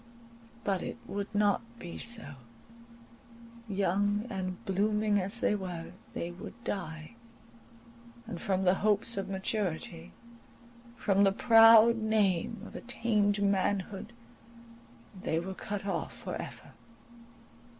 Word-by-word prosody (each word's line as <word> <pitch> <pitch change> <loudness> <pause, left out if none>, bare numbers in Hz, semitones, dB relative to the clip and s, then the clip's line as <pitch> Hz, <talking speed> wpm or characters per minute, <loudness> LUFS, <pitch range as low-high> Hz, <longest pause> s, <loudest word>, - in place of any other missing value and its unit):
But 195 -3 0
it - - -5
would 200 0 -4
not 205 -1 +3 0.2
be 175 -6 -8
so; 225 -11 0 1.4
young 205 +2 +1
and 185 -1 -4
blooming 210 +2 +1
as 200 +5 +3
they - - +3
were, 180 -5 -5 0.2
they 170 - -4
would 175 - -9
die, 160 -3 -5 1.1
and 200 -7 -7
from 190 -1 0
the 180 -1 +5
hopes 210 +3 +2
of 195 0 -3
maturity, 190 - -3 0.8
from 200 -3 +2
the 195 - +5
proud 225 +2 +7
name 215 -2 0
of - - -11
attained 210 -4 +1
manhood, 200 +1 0 1.1
they 160 - 0
were 190 +3 -5
cut 200 +1 -5
off 195 - -3
for - - -6
ever. - - -8
200 Hz, 115 wpm, -30 LUFS, 185-215 Hz, 1.4 s, proud